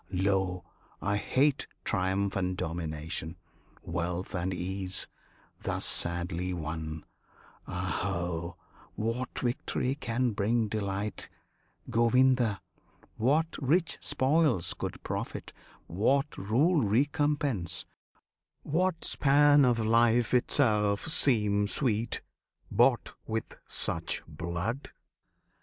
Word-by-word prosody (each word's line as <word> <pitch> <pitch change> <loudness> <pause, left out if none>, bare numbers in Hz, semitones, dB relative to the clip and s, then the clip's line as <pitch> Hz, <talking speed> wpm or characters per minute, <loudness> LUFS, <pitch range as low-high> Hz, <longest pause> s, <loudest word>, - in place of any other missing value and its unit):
Lo, 95 -1 0 0.4
I 100 +1 0
hate 135 +6 +1 0.2
Triumph 95 0 0
and 90 -1 -1
domination, 80 -1 -4 0.5
wealth 85 +3 -3
and 90 0 -1
ease, 95 +1 -3 0.5
Thus - - -1
sadly 85 +1 -1
won! 80 -1 -5 0.6
Aho! 85 0 -2 0.4
what 115 +3 -3
victory 125 +1 -1
Can 125 -3 -1
bring 110 +2 +1
delight, 100 -1 -3 0.6
Govinda! 120 -2 +3 0.6
what 150 +8 +2
rich 155 +3 +1
spoils 135 - +2
Could - - -6
profit; - - -5 0.3
what 135 - +1
rule 140 - +2
recompense; 130 - 0 0.8
what 170 +2 0
span 145 +1 +5
Of 125 -2 +4
life 115 +2 +3
itself 105 -5 +2
seem 105 -10 +3
sweet, 115 -1 0 0.5
bought - - +3
with 110 0 -3
such 80 0 -1
blood? 85 - -4
105 Hz, 90 wpm, -30 LUFS, 90-130 Hz, 0.8 s, span